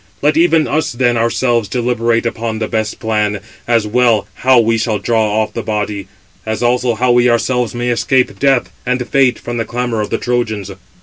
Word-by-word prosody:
Let 150 +1 +3
even 165 -1 +3
us 155 -3 -1
then 120 0 +1
ourselves 115 -1 0
deliberate 120 -2 0
upon 115 -1 -3
the 110 -1 -2
best 110 -1 -2
plan, 105 -2 -1 0.3
as 115 -2 +2
well 115 -1 +2
how 130 -1 +3
we 115 0 +2
shall 110 -1 0
draw 110 -1 +1
off 105 -1 -8
the 115 - -3
body, 105 -2 -3 0.4
as 110 +2 -3
also 125 0 +1
how 125 +2 +1
we 120 0 +4
ourselves 120 0 0
may 120 +1 -2
escape 125 +2 +1
Death 135 -3 +2
and 125 0 -2
Fate 130 -2 +2
from 120 0 -6
the 115 - 0
clamour 120 -2 -2
of 105 - -3
the - - -1
Trojans." 110 -5 -2
120 Hz, 190 wpm, -15 LUFS, 110-125 Hz, 0.4 s, we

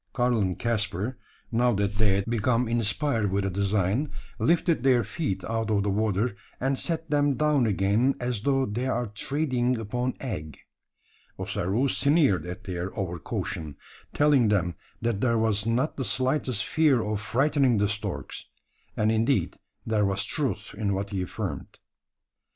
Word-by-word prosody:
Karl 120 -2 +2
and 95 -3 0
Caspar 110 0 -1 0.3
now 120 +1 +3
that 100 0 -1
they 105 -3 +4
had 100 0 0
become 120 +1 +1
inspired 115 -1 0
with 100 0 0
a 95 - -1
design 100 +7 +1 0.3
lifted 170 -2 +2
their 125 -2 +4
feet 110 - -3
out 115 -1 -2
of 100 -2 +2
the 100 - 0
water, 105 +2 0 0.2
and 135 +2 +1
set 160 +2 -3
them 145 -1 +3
down 150 -5 +2
again, 105 +6 +2
as 125 -4 -2
though 135 +2 +2
they 120 +3 -2
ere 120 -1 0
treading 130 0 0
upon 125 +3 -2
egg. 80 - -5 0.8
Ossaroo 105 +10 0
sneered 140 - +3
at 90 +5 -6
their 90 -1 -4
over 90 -4 -3
caution 75 -2 -4 0.3
telling 145 -5 +4
them, 90 -4 +1 0.3
that 115 -4 0
there 115 -2 +2
was 110 -1 +1
not 125 +6 0
the 135 - -1
slightest 130 -3 0
fear 150 -7 +3
of 105 -1 -2
frightening 135 +1 +2
the 105 0 +2
storks; 105 0 -4 0.5
and 110 +1 +2
indeed 115 +4 +1 0.3
there 110 -2 +1
was 100 +1 +1
truth 110 -9 -2
in 100 -2 0
what 100 +1 -3
he 95 -2 -1
affirmed. 90 - -5
115 Hz, 155 wpm, -27 LUFS, 100-130 Hz, 0.8 s, they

